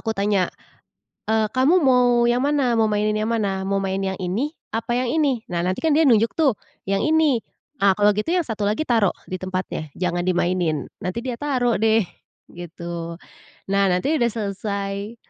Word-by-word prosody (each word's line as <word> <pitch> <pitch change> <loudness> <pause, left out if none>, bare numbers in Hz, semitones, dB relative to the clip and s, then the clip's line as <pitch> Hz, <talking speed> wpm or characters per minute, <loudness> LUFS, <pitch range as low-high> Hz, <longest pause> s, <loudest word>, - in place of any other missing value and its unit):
aku 225 - -2
tanya, 200 -2 0 0.8
"Eee, 220 0 +3
kamu 270 +8 +4
mau 250 -5 +4
yang 240 +1 +2
mana? 280 -3 +1
Mau 225 -2 +2
mainin 210 0 +1
yang 215 +1 -1
mana? 200 -4 -1
Mau 195 +1 -1
main 195 0 -2
yang 190 -1 -2
ini, 195 +10 -2 0.2
apa 230 +2 -1
yang 250 -1 -1
ini?" 275 -7 +1
Nah 175 -1 -2
nantikan 185 - 0
dia 315 +2 +4
nunjuk, 230 -1 +3
tuh, 280 -9 +2 0.3
"Yang 195 +11 +1
ini!" 315 -2 +4 0.5
Nah, 200 -3 +4
"Kalau 205 +2 +3
gitu 215 +11 0
yang 360 - +3
1 220 -4 -3
lagi 210 +7 0
taruh 230 -9 +2 0.2
di 185 - -3
tempatnya, 185 -5 -4
jangan 175 -1 -2
dimainin." 175 -4 0
Nanti 185 +6 -4
dia 250 -1 -4
taruh, 250 -5 0
deh, 220 +1 +3 0.5
gitu. 170 -1 -7 0.6
Nah, 200 0 +3
nanti 230 - +1
udah 235 - +3
selesai 200 0 -4
215 Hz, 175 wpm, -22 LUFS, 190-245 Hz, 0.8 s, kamu